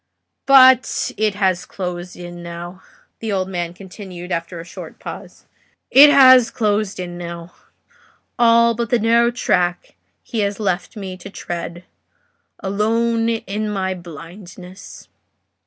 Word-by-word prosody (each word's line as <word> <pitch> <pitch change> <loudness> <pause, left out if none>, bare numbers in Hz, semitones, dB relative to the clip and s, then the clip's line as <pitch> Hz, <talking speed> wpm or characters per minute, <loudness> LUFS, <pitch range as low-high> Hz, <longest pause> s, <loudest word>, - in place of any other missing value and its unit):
But 260 -2 +5
it 215 -2 0
has 190 -3 0
closed 180 -1 -6
in 175 0 -9
now," 175 +2 -8 0.4
the 225 -1 -4
old 190 -2 -1
man 175 -3 -4
continued, 185 -1 -10
after 170 +1 -4
a - - -7
short - - -10
pause; - - -10 0.5
"it 290 +2 +9
has 260 -4 +7
closed 210 -3 -1
in 175 -1 -6
now;—all 230 +7 -2
but 230 -1 -3
the 245 - +3
narrow 235 +1 +3
track 180 -7 -1 0.3
he 230 - -5
has 200 0 -1
left 195 +1 -2
me 190 -2 -6
to 185 +2 -10
tread—alone 215 - -4
in 215 -1 -3
my 190 -2 -2
blindness." 180 +2 -12
195 Hz, 125 wpm, -19 LUFS, 175-230 Hz, 0.5 s, it